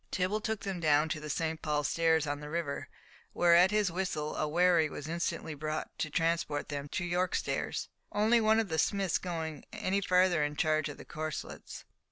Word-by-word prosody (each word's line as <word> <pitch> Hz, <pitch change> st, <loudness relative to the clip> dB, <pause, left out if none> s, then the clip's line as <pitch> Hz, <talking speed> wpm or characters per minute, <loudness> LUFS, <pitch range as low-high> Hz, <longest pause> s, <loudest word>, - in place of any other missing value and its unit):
Tibble 190 Hz, +4 st, 0 dB
took 220 Hz, -1 st, -2 dB
them 195 Hz, -3 st, -3 dB
down 155 Hz, -1 st, +3 dB
to 155 Hz, -, -2 dB
the 150 Hz, 0 st, -7 dB
St. 160 Hz, +1 st, -2 dB
Paul's 150 Hz, -2 st, 0 dB
stairs 160 Hz, -2 st, +2 dB
on 145 Hz, 0 st, -2 dB
the 150 Hz, 0 st, -8 dB
river, 160 Hz, -3 st, -3 dB, 0.4 s
where 175 Hz, -1 st, +4 dB
at 180 Hz, +2 st, +7 dB
his 210 Hz, -3 st, +1 dB
whistle 165 Hz, -4 st, -2 dB
a 155 Hz, -, 0 dB
wherry 170 Hz, 0 st, +3 dB
was 145 Hz, -, -7 dB
instantly 165 Hz, -1 st, -2 dB
brought 155 Hz, +1 st, -4 dB
to 155 Hz, -, -1 dB
transport 165 Hz, -2 st, 0 dB
them 145 Hz, -1 st, -4 dB
to 175 Hz, -, -2 dB
York 180 Hz, +1 st, 0 dB
stairs, -, -, -2 dB, 0.2 s
only 220 Hz, +3 st, +3 dB
one 220 Hz, 0 st, +4 dB
of 220 Hz, -3 st, -1 dB
the 160 Hz, -1 st, 0 dB
smiths 195 Hz, 0 st, +1 dB
going 160 Hz, -4 st, -4 dB
any 200 Hz, -2 st, -1 dB
further 180 Hz, -4 st, +3 dB
in 145 Hz, 0 st, -2 dB
charge 155 Hz, 0 st, +1 dB
of 145 Hz, -, -8 dB
the -, -, -11 dB
corslets. 155 Hz, -2 st, -6 dB
165 Hz, 200 wpm, -31 LUFS, 155-185 Hz, 0.4 s, at